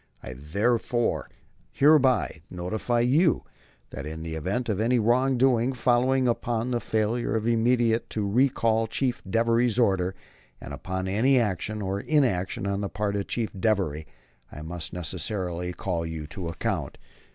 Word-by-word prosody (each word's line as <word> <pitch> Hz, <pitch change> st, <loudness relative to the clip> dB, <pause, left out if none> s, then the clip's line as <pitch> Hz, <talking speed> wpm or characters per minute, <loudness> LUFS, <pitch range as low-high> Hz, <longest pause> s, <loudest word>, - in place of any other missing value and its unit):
I 60 Hz, -, -7 dB
therefore 115 Hz, -, 0 dB, 0.4 s
hereby 135 Hz, -, +3 dB
notify 110 Hz, +7 st, -1 dB
you 145 Hz, +8 st, +3 dB, 0.5 s
that 70 Hz, +3 st, -6 dB
in 80 Hz, +1 st, -6 dB
the 80 Hz, -1 st, -5 dB
event 95 Hz, +10 st, -2 dB
of 105 Hz, -3 st, -1 dB
any 120 Hz, +3 st, +2 dB
wrong 125 Hz, +4 st, +2 dB
doing 125 Hz, 0 st, +3 dB
following 125 Hz, +1 st, +2 dB
upon 120 Hz, 0 st, -1 dB
the 120 Hz, -, +1 dB
failure 110 Hz, +1 st, -1 dB
immediately 115 Hz, +1 st, +2 dB
to 105 Hz, -2 st, -2 dB
recall 115 Hz, -1 st, +2 dB
Chief 125 Hz, +2 st, -2 dB
Devery's 115 Hz, +3 st, +2 dB
order, 95 Hz, -5 st, +2 dB, 0.4 s
or -, -, -8 dB
upon 95 Hz, 0 st, -4 dB
any 120 Hz, +8 st, +3 dB
action 105 Hz, 0 st, -2 dB
or 95 Hz, +1 st, -2 dB
inaction 100 Hz, -, 0 dB
on 100 Hz, 0 st, -1 dB
the 100 Hz, -, -2 dB
part 105 Hz, 0 st, -2 dB
of 100 Hz, -1 st, -2 dB
Chief 115 Hz, -3 st, -2 dB
Devery, 95 Hz, -7 st, 0 dB, 0.4 s
I 75 Hz, -, -8 dB
must 80 Hz, 0 st, -5 dB
necessarily 90 Hz, +1 st, -3 dB
call 90 Hz, -2 st, -3 dB
you 80 Hz, -2 st, -5 dB
to 85 Hz, +3 st, -6 dB
account. 85 Hz, -, -3 dB
110 Hz, 145 wpm, -26 LUFS, 95-120 Hz, 0.5 s, hereby